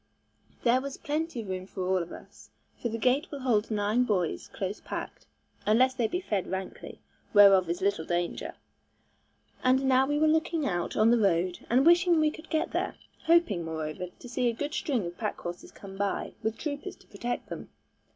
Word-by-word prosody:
There 245 +1 +4
was 275 0 -6
plenty 305 -3 -2
of 205 - -9
room 185 0 -4
for 190 -2 -4
all 185 -1 +2
of 170 - -7
us, - - -13 0.3
for 240 - -1
the 230 - -3
gate 255 +8 +2
will 285 -2 -7
hold 230 -4 +1
nine 215 +3 +2
boys 185 -8 -1
close 195 0 -5
packed, - - -6 0.4
unless 250 +5 +4
they 245 -3 0
be 355 - -2
fed 205 - -2
rankly, 190 0 -6 0.3
whereof 195 -3 +7
is 175 +2 -2
little 200 -5 +1
danger; 175 0 -2 1.1
and 260 +1 +4
now 265 0 +4
we 290 +1 +1
were 310 +1 +4
looking 320 0 +1
out 175 -8 -2
on 220 +2 +5
the 240 - +4
road 180 -3 +1
and 255 +4 +4
wishing 345 0 +5
we 310 -1 +3
could 315 - -12
get 315 -1 0
there; - - -1 0.3
hoping, 330 - +3
moreover, 160 +2 -4
to - - -11
see 245 +1 0
a - - -1
good 290 +5 -4
string 270 - -1
of 170 0 -7
pack - - -2
horses 175 0 -7
come 195 -1 -11
by, 200 0 -2
with 220 0 -2
troopers 290 -2 -5
to - - -22
protect 240 +4 -4
them. - - -7
230 Hz, 195 wpm, -29 LUFS, 190-280 Hz, 1.1 s, whereof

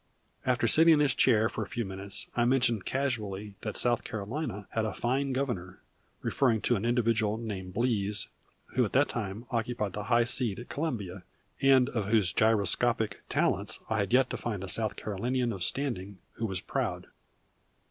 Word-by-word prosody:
After 125 -2 +2
sitting 160 +6 +7
in - - +1
his 145 -2 +4
chair 110 -4 +4
for - - -5
a 105 - -3
few 120 -1 -3
minutes 95 +1 -4
I 120 - +2
mentioned 120 -4 +2
casually 105 -7 -2
that 110 -3 -3
South 120 -1 +3
Carolina 105 0 -4
had 110 - 0
a 110 - -2
"fine 135 +3 0
Governor," 120 -10 -3 0.4
referring 115 -5 +2
to 120 - +2
an 105 +1 -2
individual 115 -3 +1
named 95 -5 -6
Blease, 105 -3 0 0.5
who 130 - +3
at 105 - -3
that 140 +3 +4
time, 105 0 -4
occupied 115 -4 -2
the 105 -1 -4
high 120 0 +4
seat 115 -3 +1
at 120 - -9
Columbia, 105 - -3 0.4
and 135 -2 +5
of 110 -5 -2
whose 105 -5 +3
gyroscopic 110 +1 +2
talents 100 +3 +1
I 110 - +1
had 100 -1 -1
yet 130 +1 +4
to - - -2
find 105 -5 -4
a 95 - -5
South 110 +2 +1
Carolinian 120 +4 -1
of 95 -3 -4
standing 100 -8 -3 0.2
who 115 - -3
was 95 -3 -3
proud. - - -2
115 Hz, 180 wpm, -29 LUFS, 100-125 Hz, 0.5 s, sitting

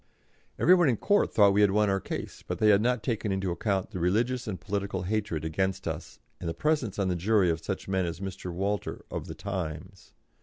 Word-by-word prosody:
Every 180 - +6
one 175 -5 +5
in 120 - +1
court 205 - +2
thought 100 -2 +6
that - - +3
we 100 +1 +3
had 105 - +6
won 105 +2 +3
our 95 0 +1
case, - - -6
but - - -2
they 110 - +4
had 100 -1 +6
not 125 -1 +1
taken 110 -4 -1
into 95 -1 -1
account 95 +1 -1
the 90 - -5
religious 115 +8 +1
and 95 -4 -4
political 100 -2 -3
hatred 95 -5 -2
against 95 +4 -1
us - - -5 0.2
and 85 - -3
the 80 - -4
presence 145 - 0
on 100 -2 +1
the 90 - 0
jury 95 0 +3
of 80 0 -4
such 95 - -4
men 95 -2 0
as 85 +1 -5
Mr. 95 -2 -5
Walter, 100 +4 -3
of - - -4
the - - -7
Times. 95 -1 -6
100 Hz, 230 wpm, -28 LUFS, 90-105 Hz, 0.2 s, Every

